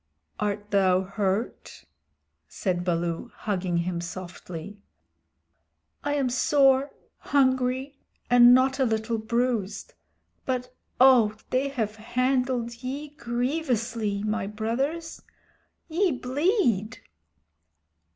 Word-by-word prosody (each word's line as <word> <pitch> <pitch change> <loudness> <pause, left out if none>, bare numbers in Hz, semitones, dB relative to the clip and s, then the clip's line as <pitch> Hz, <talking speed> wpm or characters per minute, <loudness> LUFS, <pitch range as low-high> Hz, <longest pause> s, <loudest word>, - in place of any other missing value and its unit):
"Art 205 0 -2
thou 190 -2 +3
hurt?" 195 +3 -3 0.6
said 175 - -2
Baloo, 170 -1 -2
hugging 185 -4 -2
him 170 0 -1
softly. 180 +2 -8 1.2
"I 290 0 0
am 275 -3 +1
sore, 270 +2 +3 0.3
hungry, 260 0 +1 0.3
and 245 0 +7
not 265 +2 +4
a - - +4
little 220 0 -1
bruised. 235 -2 -1 0.5
But, 250 -1 -3 0.3
oh, 245 -5 +6 0.2
they 260 +2 +1
have 225 -6 -3
handled 250 0 -1
ye 275 +4 -5
grievously, 240 -6 -2
my 215 -1 -1
Brothers! 265 +10 -3 0.7
Ye 345 +3 +1
bleed." 250 - 0
240 Hz, 95 wpm, -26 LUFS, 205-265 Hz, 1.2 s, and